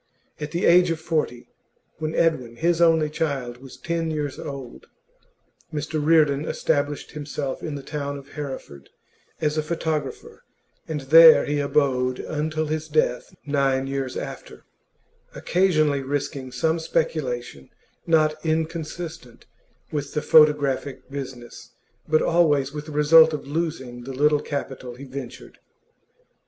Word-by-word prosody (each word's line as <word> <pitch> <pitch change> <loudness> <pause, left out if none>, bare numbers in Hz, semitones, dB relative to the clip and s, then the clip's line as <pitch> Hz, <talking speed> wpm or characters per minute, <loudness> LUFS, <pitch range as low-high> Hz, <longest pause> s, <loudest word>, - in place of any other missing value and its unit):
At 150 0 -4
the 170 +4 -1
age 180 +1 +6
of 165 -1 -1
forty 155 -7 -2 0.5
when 155 0 -3
Edwin, 130 -8 +1
his 170 +4 +1
only 165 -2 +4
child, 140 -6 -3
was 130 +1 -13
ten 170 -1 -2
years 150 -3 -3
old 135 -4 -8 0.8
Mr 155 0 -3
Reardon 150 -2 +4
established 145 -2 -1
himself 145 -2 -5
in 150 - -4
the 140 - -7
town 140 0 -4
of 140 0 -13
Hereford 130 - -8 0.5
as 155 0 +1
a - - +2
photographer, 155 -3 -4 0.5
and 155 -2 -3
there 160 +4 +8
he 145 0 -1
abode 130 -3 +1
until 155 +1 -2
his 155 +1 -3
death, 150 -5 0
nine 135 -2 +1
years 135 -1 -3
after, - - -8 0.7
occasionally 155 -6 +2
risking 135 -1 -4
some 160 +7 0
speculation 130 - -2 0.4
not 155 -2 +2
inconsistent 160 -4 -4 0.5
with 145 -1 -4
the 150 - -1
photographic 140 -3 +3
business, 130 -4 -8 0.3
but 155 0 +3
always 145 -5 +2
with 150 0 -6
the - - -7
result 160 +2 +6
of 150 - -4
losing 140 -6 -4
the 135 - -6
little 150 +2 +3
capital 135 -3 -5
he 130 - -11
ventured. 130 -2 -9
150 Hz, 130 wpm, -24 LUFS, 135-160 Hz, 0.8 s, there